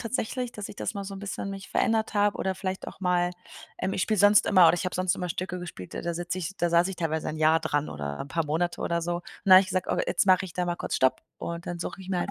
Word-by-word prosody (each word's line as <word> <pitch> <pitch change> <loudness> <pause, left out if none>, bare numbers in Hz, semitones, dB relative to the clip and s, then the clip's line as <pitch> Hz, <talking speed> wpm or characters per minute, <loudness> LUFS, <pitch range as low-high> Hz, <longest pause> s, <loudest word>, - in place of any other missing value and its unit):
tatsächlich, 250 +1 -2
dass 210 -3 -7
ich - - -9
das - - -3
mal 200 -2 -5
so 195 0 -6
'n 195 - -8
bisschen 195 0 -4
mich 195 -1 -8
verändert 225 0 +1
habe 205 0 +2
oder 190 -1 -2
vielleicht 190 0 -4
auch - - -12
mal 180 -1 +1 0.5
ähm, 190 - -1
ich 185 - 0
spiele 215 -3 0
sonst 205 +1 +6
immer 185 -3 +6
oder - - +6
ich 175 - -3
habe 185 - -2
sonst 185 +1 +1
immer 180 -1 -4
Stücke 180 +1 -4
gespielt, 125 - -8
da - - -3
da 170 0 -3
sitze 175 +2 -3
ich 185 +2 -5
da 175 - +1
saß 170 +2 +3
ich 190 - -5
teilweise 160 -2 -2
ein 155 - -4
Jahr 155 +1 +4
dran 145 0 -1
oder 70 -1 -5
'n - - -5
paar 165 +3 -1
Monate 165 +4 -1
oder 170 0 -1
so. 175 +1 -2 0.2
Dann 190 - +5
habe 185 - +11
ich 190 - -3
gesagt: 185 -1 -1
„Oh, - - +1
jetzt - - +1
mache 185 0 +5
ich 180 - -8
da 180 - -1
mal 175 0 -1
kurz - - -2
Stopp 130 0 +2 0.2
und 170 0 -5
dann 175 -1 -4
suche 175 - -5
ich 190 - -11
mir 185 -2 0
halt - - -2
180 Hz, 300 wpm, -27 LUFS, 170-195 Hz, 0.5 s, habe